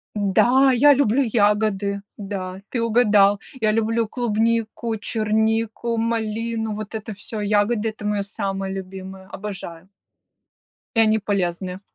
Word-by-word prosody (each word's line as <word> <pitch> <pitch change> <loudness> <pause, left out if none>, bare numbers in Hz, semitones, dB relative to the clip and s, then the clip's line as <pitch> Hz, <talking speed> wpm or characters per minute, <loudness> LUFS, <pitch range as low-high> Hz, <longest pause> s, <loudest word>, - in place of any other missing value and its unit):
Да, 240 +7 +4
я 285 +4 +6
люблю 275 -1 +2
ягоды! 205 -3 +1 0.2
Да, 190 -2 -5
ты 240 - -2
угадал. 210 -3 +4 0.2
Я 215 -1 +3
люблю 225 0 +1
клубнику, 230 -1 -1
чернику, 220 +2 0
малину, 225 -1 -1
вот 215 +1 -6
это 215 0 -5
всё 205 +2 -6
ягоды- 210 +2 +1
это 215 -1 -9
моё 210 -1 0
самое 195 -1 -3
любимое, 190 0 -8
обожаю. 190 -4 -8 1.1
И - - +3
они 220 0 +4
полезны. 185 -2 -2
215 Hz, 120 wpm, -22 LUFS, 200-225 Hz, 1.1 s, я